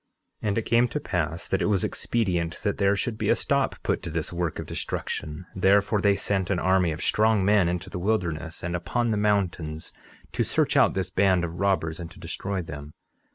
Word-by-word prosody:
11:28 - - -2
And 100 - 0
it - - +2
came 120 +1 +4
to 150 - -3
pass 85 - -2
that 95 - 0
it - - +2
was 100 -4 +1
expedient 90 -7 -1
that 100 - -1
there 100 0 +3
should 110 +1 -2
be - - 0
a - - +5
stop - - +1
put - - 0
to - - -6
this 85 +1 -3
work 85 -2 -2
of - - -5
destruction; 75 +4 -4
therefore 100 +2 +3
they 100 0 +4
sent 95 -2 -1
an 95 - +1
army 90 -1 +2
of 80 - -4
strong 110 -2 +3
men 100 -4 +4
into 90 +1 -3
the 90 - -5
wilderness 85 -5 -2
and 85 0 -2
upon 115 +7 -1
the 105 - +1
mountains 90 -7 -1 0.4
to - - 0
search - - +1
out - - +4
this 95 -1 -2
band 95 -2 +3
of 85 0 -4
robbers, 95 -5 0
and 85 -1 -6
to 95 - -14
destroy 95 +2 -3
them. 75 -1 -9
95 Hz, 215 wpm, -26 LUFS, 85-100 Hz, 0.4 s, a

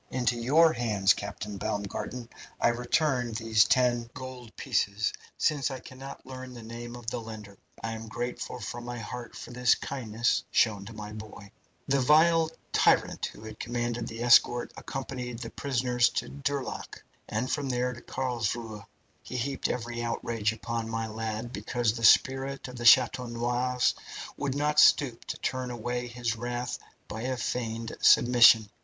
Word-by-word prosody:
Into 125 -1 0
your 150 +8 +4
hands, 105 -5 +3
Captain 100 +1 -6
Baumgarten, 105 +5 -4 0.3
I - - +4
return 125 0 0
these 110 -1 +3
ten 120 -2 +2
gold 130 -3 -9
pieces, 100 +2 0 0.2
since 145 -2 +1
I 135 - -5
cannot 130 +2 -10
learn 130 -1 -8
the 120 - -9
name 120 +1 -7
of 120 -1 -10
the 120 - -3
lender. 105 -3 -10 0.2
I 115 - -2
am 110 0 -6
grateful 120 +2 -4
from 120 +2 -6
my 120 0 -5
heart 120 +1 -7
for - - -9
this 125 -1 +3
kindness 120 -3 -1
shown 105 -4 +2
to 115 - -9
my 105 -1 -7
boy. 105 -2 -10 0.4
"The 140 0 +2
vile 160 +4 +5 0.2
tyrant - - +3
who 110 +1 -10
commanded 120 +1 -3
the 115 +1 -5
escort 120 0 +5
accompanied 125 -3 -5
the 115 -1 -7
prisoners 125 -2 +1
to - - -1
Durlack, 140 -1 -4 0.3
and 110 +5 -1
from 140 -2 -1
there 125 0 0
to 120 - -11
Carlsruhe. 115 -4 -3 0.4
He 125 - -6
heaped 135 +3 -2
every 120 -1 -3
outrage 115 -2 -1
upon 115 +1 -4
my 115 0 -2
lad, 110 +2 -4
because 120 -3 0
the 115 0 -6
spirit 135 +4 +4
of 125 - -9
the 120 -1 -6
Chateau 125 +1 +6
Noirs 120 +2 +1 0.4
would 140 -2 -2
not 150 +1 +2
stoop 130 -6 +5
to - - -5
turn 130 -1 -2
away 120 +1 -3
his 120 -2 -2
wrath 120 +1 -4 0.3
by 110 +1 -6
a 130 +1 -2
feigned 115 -2 -3
submission. 120 -3 +7
120 Hz, 160 wpm, -28 LUFS, 115-125 Hz, 0.4 s, submission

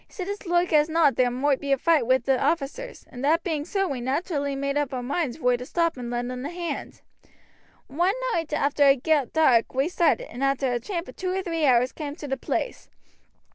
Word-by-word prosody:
"He - - -25
said 370 -3 -5
as 405 -1 -6
loike 345 0 +1
as 300 +1 +4
not 315 -3 +3
there 250 -1 +3
moight 265 +3 +1
be 280 -1 -4
a 275 - +4
foight 315 -4 +2
wi' 260 +1 +5
the 260 +1 0
officers, 335 - -2
and 250 +1 -8
that 320 +4 +2
being 310 -6 -2
so 390 +2 0
we 270 -6 -4
naterally 285 +1 -1
made 280 0 -2
up 290 -2 -1
our 250 - -4
moinds 280 0 -2
vor 250 -5 +2
to 250 - -7
stop 335 +5 0
and 245 -2 -6
lend 245 +1 -3
un 250 0 -5
a 285 - -3
hand. 345 -1 -5 0.8
One 350 +9 0 0.2
night 325 -2 -2
arter 285 -1 +2
it 275 -2 +4
got 300 -5 +2
dark 260 -8 +3
we 270 +5 +1
started, 360 +8 +1
and 250 - -7
arter 275 -2 +1
a 240 - 0
tramp 345 - -4
of - - -12
two 370 -1 -2
or 380 0 -2
three 330 -4 -1
hours 250 0 +4
cam' 295 -2 -6
to 300 - -8
the 270 - -1
place. 470 - -4
285 Hz, 235 wpm, -25 LUFS, 260-335 Hz, 0.8 s, wi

